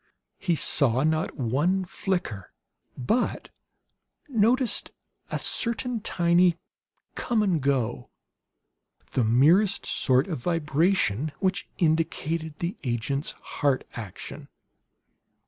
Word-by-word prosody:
He 175 -3 +1
saw 135 -4 +2
not 155 +1 0
one 150 +10 +1
flicker, 175 - -3 0.5
but 220 - -1 0.8
noticed 235 -2 +2 0.4
a - - -2
certain 235 0 -1
tiny 175 -2 +3 0.6
come 225 -3 0
and 180 -7 +1
go, 125 - -1 1.0
the 125 - +1
merest 160 - +4
sort 130 +1 +2
of 165 -8 -4
vibration, 155 - +1
which 190 0 -1
indicated 160 -2 0
the 175 +2 -3
agent's 125 +4 -1
heart 140 -3 -1
action. 105 -6 -8
160 Hz, 95 wpm, -26 LUFS, 135-190 Hz, 1.0 s, merest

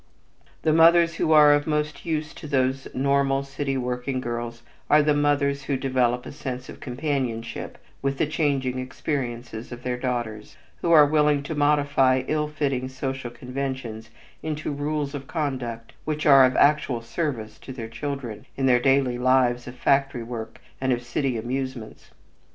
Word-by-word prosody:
The 155 - +3
mothers 170 +1 +5
who 160 - +1
are 150 -1 +8
of 145 +1 +1
most 150 +2 -2
use 155 -1 -2
to 150 - -9
these 130 -1 0
normal 140 0 +2
city 135 0 -3
working 125 +1 -2
girls 120 -1 -5 0.3
are 150 0 +6
the 150 0 +3
mothers 145 -1 +1
who 140 -1 0
develop 125 -2 0
a - - -7
sense 130 -2 -6
of - - -10
companionship 130 -4 -3 0.2
with 135 0 -1
the - - +2
changing 140 -4 0
experiences 125 -3 -4
of 120 0 -8
their 125 -1 -2
daughters, 120 -4 -4 0.2
who 170 - -1
are 155 -3 +8
willing 150 -1 +2
to 160 - -4
modify 145 -3 +3
ill 150 0 0
fitting 140 -4 -2
social 130 -1 -4
conventions 125 -3 -5 0.3
into 155 -1 -3
rules 145 0 -2
of 135 -2 -6
conduct 130 -7 -4
which 155 +1 -3
are 135 -3 +8
of 130 - +1
actual 140 -5 +3
service 115 -4 -3
to - - -9
their 120 -3 -6
children 135 -3 -5
in 135 - 0
their 125 -2 +5
daily 135 -1 +2
lives 125 -1 +2
of 125 - -8
factory 135 -1 +1
work 115 -1 -7 0.2
and 130 0 +1
of 120 -1 0
city 125 +1 -1
amusements. 130 0 -5
135 Hz, 160 wpm, -25 LUFS, 125-145 Hz, 0.3 s, are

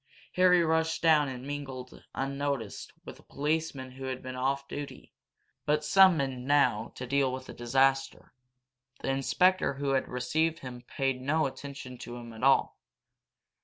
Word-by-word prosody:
Harry 180 -1 +5
rushed 160 0 +1
down, 155 -3 +5
and 130 -1 -6
mingled, 135 -3 -7
unnoticed, 140 -5 -3
with - - -9
the - - -17
policemen 145 -3 -2
who 135 +1 -8
had 130 -1 -4
been 130 0 -6
off 135 +2 -1
duty, 145 0 -8 0.5
but 150 0 +1
summoned 150 -8 +4
now 140 -6 +2
to 125 - -6
deal 140 0 +1
with 130 0 -6
this - - -10
disaster. 135 +2 +1 0.7
The - - -2
inspector 140 +5 +2
who 140 +1 -2
had 135 -1 +1
received 155 +6 0
him 125 -2 -8
paid 135 0 -2
no 155 +4 +1
attention 135 -2 -7
to 120 - -7
him 120 -1 -9
at 110 - -10
all. 135 +1 +3
135 Hz, 155 wpm, -29 LUFS, 130-150 Hz, 0.7 s, Harry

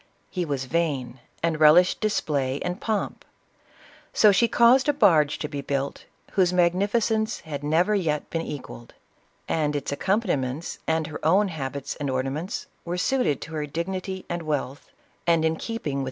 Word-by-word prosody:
He 180 -2 -2
was 140 -4 -2
vain, 135 -5 -1 0.2
and 165 -2 0
relished 155 +4 +6
display 145 -10 0
and 180 +2 -3
pomp; 215 -3 -2 0.5
— - - -27 0.3
so 210 - +6
she 235 +4 +4
caused 245 +5 +5
a - - +4
barge 165 - +4
to 150 - -4
be 145 -2 -5
built, 140 0 -3 0.3
whose 185 -2 +3
mag 175 -1 +3
nificence 220 +3 0
had 145 -3 -6
never 165 +8 +2
yet 160 -7 0
been 165 - -1
equalled; 130 -6 -8 0.5
and 150 -2 0
its 145 - -3
accom 195 +10 +1
paniments, 140 - -2
and 160 0 +1
her 150 0 -8
own 190 +6 +4
habits 140 -4 -5
and 145 -2 -3
ornaments, 135 +7 -3 0.2
were 175 +1 -3
suited 250 - +1
to 160 - -8
her 150 -1 -3
dignity 185 +4 -4
and 175 0 -3
wealth, 145 -3 -3 0.4
and 165 -1 +3
in 160 0 +2
keeping 230 +7 -5
with 230 - -7
CLEOPATRA. 140 -2 -1
160 Hz, 175 wpm, -25 LUFS, 145-190 Hz, 0.5 s, relished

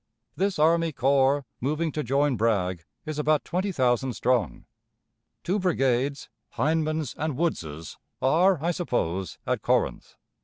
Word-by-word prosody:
"This 195 0 0
army 165 +2 +3
corps, 135 +1 +2
moving 155 +5 -1
to 150 - -2
join 140 +1 +1
Bragg, 95 -6 0 0.2
is 155 -1 -4
about 150 0 +2
twenty 185 +3 -1
thousand 130 -4 +1
strong. 120 - 0 0.8
Two 190 +5 0
brigades, 140 -6 0 0.3
Hindman's 155 +1 0
and 150 -3 -2
Woods's, 80 - -3 0.2
are, 175 +7 +4
I 170 - +2
suppose, 95 - -2
at - - -1
Corinth. - - 0
145 Hz, 125 wpm, -26 LUFS, 125-160 Hz, 0.8 s, are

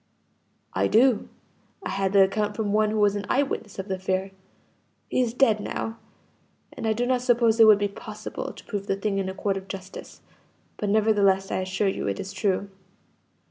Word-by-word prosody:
"I - - +1
do; 240 +1 +3 0.5
I - - -4
had 195 0 0
the 200 -1 +7
account 205 +2 -1
from 210 -2 -1
one 215 0 +3
who 215 0 -1
was 205 -1 +3
an 205 0 -4
eye 275 - +3
witness 225 -6 -5
of 190 0 -5
the 190 -2 -2
affair. 190 +1 -2 0.8
He - - +2
is 240 -2 0
dead 230 -3 +3
now, 225 +2 -4 0.7
and 225 - -4
I 220 - +3
do 240 +3 -1
not 250 0 +1
suppose 235 -2 +3
it 225 - +9
would 215 -2 +8
be 205 0 0
possible 200 - -7
to - - -14
prove 200 -2 -5
the 195 - +1
thing 195 0 -1
in 190 -1 -2
a 190 - -6
court 195 -1 -1
of 190 0 -8
justice; 190 -1 -9 0.6
but 205 - -2
nevertheless 200 -3 +3
I - - 0
assure 190 +2 -1
you 190 - -2
it 100 0 -2
is 195 - -6
true. 200 -1 -1
205 Hz, 205 wpm, -25 LUFS, 195-220 Hz, 0.8 s, it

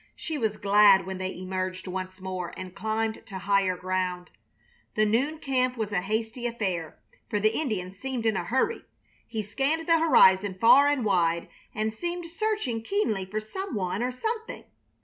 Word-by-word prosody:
She 320 - -5
was 220 -7 -1
glad 200 -1 +6
when 190 0 -5
they 185 0 -3
emerged 185 0 -4
once 185 +1 -5
more 185 -2 -5
and 185 -1 -7
climbed 220 +1 -2
to 195 - -6
higher 195 -1 +1
ground. 180 -1 -2 0.6
The 215 - +3
noon 260 +9 +1
camp 255 -4 0
was 215 -2 -2
a 180 - +1
hasty 225 +4 -2
affair, 190 -9 -3 0.3
for 210 - 0
the 215 +2 +2
Indian 210 -12 -2
seemed 240 +4 -5
in 220 -2 +2
a 180 - -1
hurry. 265 - 0 0.4
He 220 -2 -3
scanned 275 +10 -1
the 330 -1 +5
horizon 195 - +5
far 270 +5 +7
and 290 -5 +1
wide 170 -4 +1 0.3
and 215 0 -1
seemed 345 +8 -4
searching 335 - -2
keenly 225 - -1
for 210 +3 -2
some 285 - -6
one 190 +1 -2
or 250 +1 0
something. 445 - -4
215 Hz, 170 wpm, -27 LUFS, 185-260 Hz, 0.6 s, far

